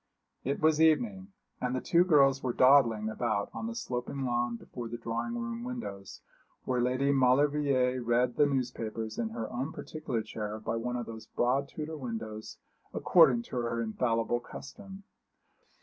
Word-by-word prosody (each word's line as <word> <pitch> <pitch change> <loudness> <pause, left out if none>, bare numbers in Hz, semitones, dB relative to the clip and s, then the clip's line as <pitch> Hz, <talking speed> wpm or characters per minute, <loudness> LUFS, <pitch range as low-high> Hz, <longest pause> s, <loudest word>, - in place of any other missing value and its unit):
It 140 +2 -1
was 155 0 +3
evening, 190 +4 +2 0.3
and 125 0 -1
the - - 0
two 170 +6 +3
girls 140 -6 +4
were 125 -2 -1
dawdling 120 -5 +5
about 110 -2 -1
on 225 - -4
the 230 - -5
sloping 135 - -3
lawn 120 -1 0
before 120 +1 -7
the 120 +1 -5
drawing 115 - -3
room 235 0 -4
windows, 235 - -7 0.4
where 125 -1 0
Lady 130 +3 +1
Maulevrier 135 -1 +3
read 120 +1 +1
the 145 - +4
newspapers 115 -5 -3
in 115 -2 -1
her 115 0 -4
own 130 +5 -3
particular 150 -10 -4
chair 105 0 -5
by 115 +1 -3
one 125 +2 -2
of 120 -1 -3
those 110 -1 -9
broad 135 +3 +1
Tudor 155 0 -6
windows, 110 -4 -6 0.4
according 135 -9 +5
to 125 - -6
her 115 -1 -1
infallible 115 +1 0
custom. 195 +11 -10
125 Hz, 160 wpm, -30 LUFS, 115-145 Hz, 0.4 s, dawdling